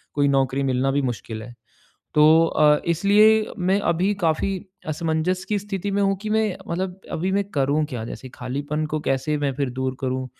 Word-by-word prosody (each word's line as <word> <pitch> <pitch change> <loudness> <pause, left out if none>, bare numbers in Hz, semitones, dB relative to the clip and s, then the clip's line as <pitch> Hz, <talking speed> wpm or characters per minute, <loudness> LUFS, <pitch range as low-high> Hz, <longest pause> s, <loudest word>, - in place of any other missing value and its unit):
कोई 145 -1 +3
नौकरी 135 0 +1
मिलना 130 0 +1
भी 145 +1 +1
मुश्किल 115 -3 -4
है। 120 +1 -10 0.6
तो 160 +2 +6
अ, 150 -2 +3
इसलिए 210 +5 +4
मैं 190 +3 +2
अभी 185 +5 +1
काफ़ी 160 +3 +1 0.4
असमंजस 160 +4 -1
की 205 -1 +1
स्थिति 200 0 -4
में 200 +1 +1
हूँ 195 0 +2
कि 215 - -4
मैं 220 -3 +1
मतलब 185 +2 -3
अभी 180 +3 -1
मैं 200 0 +2
करूँ 145 +2 +1
क्या? 120 -6 -5
जैसे 130 +2 -8
खालीपन 145 +5 -3
को 155 - 0
कैसे 135 +3 0
मैं 145 -1 0
फिर 140 -1 -1
दूर 130 0 -3
करूँ? 130 0 -2
155 Hz, 185 wpm, -23 LUFS, 135-190 Hz, 0.6 s, तो